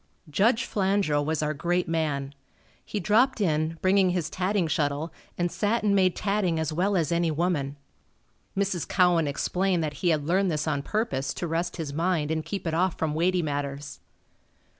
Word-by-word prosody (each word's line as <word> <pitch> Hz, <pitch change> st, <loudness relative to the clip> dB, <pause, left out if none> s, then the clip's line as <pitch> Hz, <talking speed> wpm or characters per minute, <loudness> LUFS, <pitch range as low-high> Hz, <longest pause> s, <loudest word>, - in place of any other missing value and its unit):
Judge 225 Hz, -, +3 dB
Flandrau 195 Hz, -7 st, +1 dB
was 155 Hz, 0 st, -1 dB
our 150 Hz, 0 st, 0 dB
great 175 Hz, +4 st, 0 dB
man. 145 Hz, -4 st, -1 dB, 0.5 s
He 210 Hz, -, -4 dB
dropped 225 Hz, +7 st, +3 dB
in, 160 Hz, -3 st, 0 dB
bringing 190 Hz, 0 st, +4 dB
his 175 Hz, -3 st, -1 dB
tatting 185 Hz, 0 st, 0 dB
shuttle, 150 Hz, +1 st, -1 dB, 0.2 s
and 175 Hz, -1 st, 0 dB
sat 220 Hz, +2 st, 0 dB
and 205 Hz, -1 st, +3 dB
made 185 Hz, -2 st, +3 dB
tatting 195 Hz, -5 st, 0 dB
as 160 Hz, -1 st, -1 dB
well 190 Hz, +4 st, +1 dB
as 165 Hz, -3 st, 0 dB
any 170 Hz, 0 st, +2 dB
woman. 155 Hz, -3 st, -1 dB, 0.8 s
Mrs. 195 Hz, -4 st, 0 dB
Cowan 175 Hz, -4 st, +3 dB
explained 180 Hz, +5 st, 0 dB
that 150 Hz, -1 st, -2 dB
he 180 Hz, -, +2 dB
had 155 Hz, -3 st, +1 dB
learned 185 Hz, +4 st, +2 dB
this 155 Hz, -1 st, -1 dB
on 145 Hz, -3 st, 0 dB
purpose 140 Hz, -, -2 dB
to -, -, -3 dB
rest 170 Hz, +2 st, -2 dB
his 155 Hz, -4 st, -4 dB
mind 165 Hz, -1 st, 0 dB
and 160 Hz, 0 st, -1 dB
keep 195 Hz, +2 st, -5 dB
it 165 Hz, -, -1 dB
off 180 Hz, +2 st, +1 dB
from 155 Hz, -2 st, -1 dB
weighty 175 Hz, +3 st, +1 dB
matters. 145 Hz, -1 st, -4 dB
170 Hz, 180 wpm, -26 LUFS, 155-190 Hz, 0.8 s, bringing